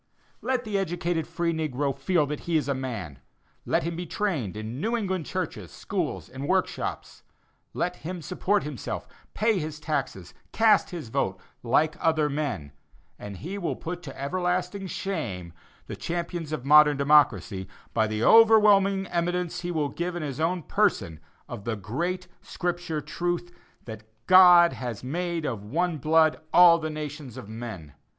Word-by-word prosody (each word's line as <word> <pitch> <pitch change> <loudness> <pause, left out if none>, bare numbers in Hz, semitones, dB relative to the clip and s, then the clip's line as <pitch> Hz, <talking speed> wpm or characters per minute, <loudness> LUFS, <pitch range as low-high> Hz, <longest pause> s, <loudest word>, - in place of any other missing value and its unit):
Let 255 -1 -1
the 210 -2 -1
educated 175 -3 -2
free 170 0 -1
negro 145 -3 -1
feel 150 +3 +1
that 145 +1 -4
he 165 - +3
is 145 -3 -1
a 140 - +1
man; 115 - -5 0.5
let - - +1
him 170 +1 -3
be 175 +1 -5
trained 155 - -2
in 110 +5 -5
New 230 +4 0
England 190 -6 -2
churches, - - -4
schools - - -4
and 135 +2 -7
workshops; 185 +1 -2 0.5
let 180 0 -1
him 175 0 -6
support 195 +5 0
himself, 145 -7 -5 0.3
pay 215 -2 +2
his 155 -1 -5
taxes, 140 - -3
and - - -36
cast 225 -1 +4
his 165 - -7
vote, 95 -4 -1 0.2
like 150 +7 +2
other 155 -2 +2
men, 140 - -3 0.5
and 100 -2 -8
he 190 - -6
will 175 - -2
put 175 +2 -6
to 135 -5 -10
everlasting 180 +5 -2
shame 95 - -4 0.3
the - - -6
champions 170 -2 -4
of 135 -5 -4
modern 150 0 +7
democracy, 120 - +3 0.3
by 110 -1 +2
the 110 +1 -2
overwhelming 210 - +6
evidence 175 0 -2
he 175 - -4
will 155 -4 -1
give 175 +5 -4
in 175 - -3
his 140 -2 -5
own 170 +1 0
person 80 - 0 0.3
of 100 - -7
the 115 +1 -2
great 170 - -3
Scripture 175 -3 -3
truth, 175 +3 -3 0.3
that 110 -2 -8 0.2
"God 180 -2 +8
has 120 -4 -6
made 170 +4 -2
of 115 -7 -3
one 165 +8 -1
blood 160 +2 +3
all 175 -1 +7
the 155 -1 -3
nations 150 -4 -7
of 125 - -8
men." 110 - -8
160 Hz, 160 wpm, -26 LUFS, 130-180 Hz, 0.5 s, God